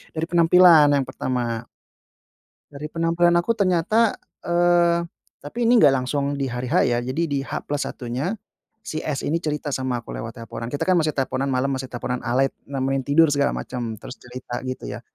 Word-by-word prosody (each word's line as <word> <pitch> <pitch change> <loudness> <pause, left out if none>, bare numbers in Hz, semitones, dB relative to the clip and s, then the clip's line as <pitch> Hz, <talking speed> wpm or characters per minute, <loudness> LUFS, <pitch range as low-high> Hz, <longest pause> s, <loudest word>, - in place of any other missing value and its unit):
dari 160 +1 -1
penampilan 170 -2 +6
yang 135 - 0
pertama. 120 -2 -3 1.0
Dari 145 +1 -8
penampilan 165 +2 +1
aku 230 +5 -1
ternyata, 200 +4 +2 0.3
eee, 175 0 +3 0.4
tapi 230 +12 -3
ini 240 0 +5
enggak 145 - +8
langsung 140 +2 -2
di 135 - -1
hari 125 0 -4
H - - +3
ya, 120 0 +1
jadi 130 +7 -3
di 140 -3 -1
H+1-nya, 140 - -4 0.5
si 155 - -4
S 145 -3 -3
ini 165 +3 0
cerita 150 -2 -3
sama 130 -2 -1
aku - - -8
lewat 115 +2 -7
teleponan, 115 +1 -7
kita 145 - -2
kan 185 - +3
masih 160 -3 +2
teleponan 135 +1 -1
malam, 135 +1 0
masih 130 -1 -4
teleponan 125 0 -4
alay 130 +3 +1 0.2
nemenin 135 0 -1
tidur 145 +2 +4
segala 140 0 +2
macam, 120 -3 -5
terus - - -11
cerita, 125 0 -7
gitu 130 0 -5
ya, - - -6
140 Hz, 175 wpm, -23 LUFS, 125-165 Hz, 1.0 s, enggak